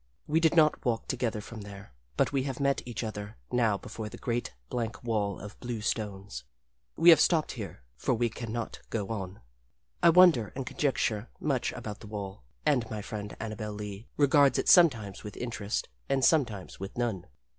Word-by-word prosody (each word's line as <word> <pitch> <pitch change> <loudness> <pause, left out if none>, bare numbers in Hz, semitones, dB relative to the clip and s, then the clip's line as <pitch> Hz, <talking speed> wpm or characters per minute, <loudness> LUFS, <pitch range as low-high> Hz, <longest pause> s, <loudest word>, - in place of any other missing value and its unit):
We 155 +2 +2
did 165 0 +3
not 155 -2 +4
walk 115 -3 -1
together 115 -4 -1
from 110 +1 -9
there, 100 -8 -10 0.2
but - - +2
we 135 - +2
have 135 0 -4
met 140 0 +2
each 120 0 -4
other 105 -1 -6
now 115 -4 +2
before 110 +2 -7
the - - -9
great, 120 0 -2 0.2
blank 115 -1 -3
wall 105 -4 -1
of 105 +1 -10
blue 120 -2 -4
stones. 100 - -3 0.5
We 170 +1 +8
have 165 - +7
stopped 160 -3 +3
here, 100 - -7
for 125 - +1
we 120 +1 +2
can 115 0 -6
not 115 0 -4
go 105 -4 -2
on. 95 -4 -5 0.6
I - - +7
wonder 165 - +6
and 135 -1 -3
conjecture 125 -6 0
much 135 -5 0
about 105 -1 -6
the 110 - -11
wall, 100 - -6 0.2
and 130 -7 +2
my 105 -2 -4
friend 105 -1 -6
Annabel 110 -1 -4
Lee 105 +1 -7
regards 140 -2 +5
it - - -1
sometimes 120 - +5
with 105 - -8
interest 115 -3 -3 0.2
and 135 -1 +3
sometimes 115 - +1
with 95 +4 -7
none. 110 -7 -1
115 Hz, 185 wpm, -29 LUFS, 105-130 Hz, 0.6 s, We